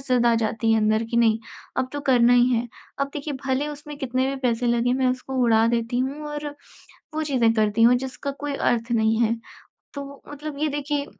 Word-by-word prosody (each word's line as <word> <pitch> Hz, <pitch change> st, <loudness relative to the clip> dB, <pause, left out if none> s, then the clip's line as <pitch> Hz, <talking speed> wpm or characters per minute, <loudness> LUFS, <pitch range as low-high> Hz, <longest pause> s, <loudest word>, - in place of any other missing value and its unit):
ज़िद 250 Hz, -2 st, +1 dB
आ 235 Hz, -, +5 dB
जाती 225 Hz, 0 st, 0 dB
है 225 Hz, -, +4 dB
अंदर 215 Hz, +1 st, +2 dB
कि 235 Hz, -, -1 dB
नहीं, 225 Hz, -2 st, +4 dB, 0.4 s
अब 255 Hz, -, 0 dB
तो 290 Hz, -, -3 dB
करना 245 Hz, -3 st, +4 dB
ही 245 Hz, 0 st, +5 dB
है। 240 Hz, 0 st, 0 dB, 0.3 s
अब 275 Hz, -, +2 dB
देखिए 295 Hz, 0 st, -4 dB
भले 270 Hz, +2 st, 0 dB
उसमें 295 Hz, 0 st, -8 dB
कितने 260 Hz, -1 st, 0 dB
भी 275 Hz, -, -2 dB
पैसे 245 Hz, -1 st, 0 dB
लगें 240 Hz, +1 st, +2 dB
मैं 260 Hz, 0 st, +1 dB
उसको 255 Hz, +1 st, -3 dB
उड़ा 225 Hz, -1 st, +4 dB
देती 235 Hz, +1 st, 0 dB
हूँ 280 Hz, +4 st, -3 dB
और 295 Hz, 0 st, -5 dB, 0.7 s
वो 315 Hz, -, 0 dB
चीज़ें 255 Hz, -6 st, +2 dB
करती 215 Hz, 0 st, +1 dB
हूँ 240 Hz, +2 st, +7 dB
जिसका 265 Hz, +2 st, -4 dB
कोई 290 Hz, 0 st, -3 dB
अर्थ 235 Hz, -2 st, 0 dB
नहीं 220 Hz, -1 st, +2 dB
है। 230 Hz, 0 st, +2 dB, 0.6 s
तो 280 Hz, 0 st, -8 dB
मतलब 290 Hz, 0 st, -7 dB
ये 305 Hz, +1 st, +1 dB
देखिए 290 Hz, 0 st, -2 dB
250 Hz, 210 wpm, -24 LUFS, 230-280 Hz, 0.7 s, हूँ